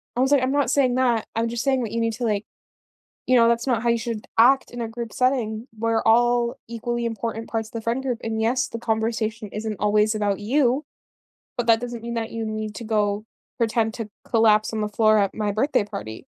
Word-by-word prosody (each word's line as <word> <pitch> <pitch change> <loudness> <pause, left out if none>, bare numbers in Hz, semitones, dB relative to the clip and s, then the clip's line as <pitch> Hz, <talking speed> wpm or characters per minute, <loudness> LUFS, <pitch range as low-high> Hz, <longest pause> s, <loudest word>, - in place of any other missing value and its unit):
I - - -2
was 265 +2 +2
like, 280 -3 +4
"I'm 260 - +1
not 285 -4 +1
saying 260 -4 +3
that, 245 -4 +2
I'm 230 +1 +1
just 235 0 -3
saying 265 -2 +1
that 220 - -4
you 230 - 0
need 230 0 0
to 240 +2 -3
like 210 -2 0 0.8
you 255 - +4
know, 230 -1 +6
that's 235 +1 +1
not 240 -4 +1
how 240 - +2
you 235 - +2
should 225 -2 -5
act 265 +4 +5
in 240 - -7
a 230 - -2
group 230 -1 -6
setting. 245 -3 0
We're 225 0 +1
all 240 +1 +3
equally 235 +1 -3
important 225 0 -3
parts 225 -1 -2
of - - -21
the 230 - -5
friend 235 +4 -1
group, 250 -3 -2
and 220 -1 -2
yes, 250 +3 +1
the 230 - -6
conversation 220 -1 -1
isn't 215 0 -4
always 210 +1 +2
about 205 -2 0
you, 260 +5 +2 0.7
but 240 -1 -1
that 225 0 +5
doesn't 240 -1 -5
mean 235 +1 -5
that 230 -1 -3
you 225 -1 -3
need 215 -1 -4
to 230 - -7
go 210 -1 0 0.3
pretend 225 -1 +1
to 225 -3 -5 0.2
collapse 220 -2 +3
on 220 - -3
the 210 - 0
floor 215 0 +4
at 200 -1 0
my 210 -1 -1
birthday 220 +3 +1
party." 200 - -7
230 Hz, 230 wpm, -23 LUFS, 220-240 Hz, 0.8 s, know